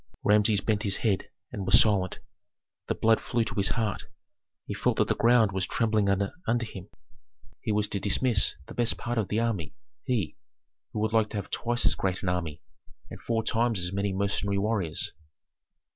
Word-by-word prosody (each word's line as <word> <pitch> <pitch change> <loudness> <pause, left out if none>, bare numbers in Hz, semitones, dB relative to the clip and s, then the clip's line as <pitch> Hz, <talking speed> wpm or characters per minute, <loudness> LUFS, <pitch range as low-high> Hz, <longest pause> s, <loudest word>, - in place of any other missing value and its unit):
Rameses 105 0 +4
bent 105 0 0
his 100 -3 +1
head, 100 -4 +1 0.2
and 105 -5 -4
was - - +8
silent. 100 -4 +2 0.7
The - - 0
blood 110 0 +3
flew 120 -1 0
to 110 - -5
his 100 -2 +3
heart. 110 -3 -2 0.6
He - - -4
felt - - 0
that - - +2
the - - +4
ground 115 -3 +4
was 95 0 -1
trembling 110 -3 +1
under 115 - -1
him. 100 -3 -10 0.7
He 110 - -2
was 105 0 +1
to 100 - -2
dismiss 105 +2 +2
the - - -10
best 120 -1 +1
part 120 -1 -2
of 105 - -1
the 105 +4 0
army, 110 - -2 0.3
he, 110 - -1 0.5
who 105 - -3
would 110 0 0
like 110 -1 +3
to 110 - -5
have 100 -1 -6
twice 120 0 -1
as - - +4
great 95 0 -2
an 95 - 0
army 85 -4 -3 0.5
and - - -9
four 115 -1 -1
times 115 0 +1
as 90 0 -2
many 100 0 -1
mercenary 100 +1 -1
warriors. 100 -5 -1
105 Hz, 190 wpm, -28 LUFS, 100-115 Hz, 0.7 s, was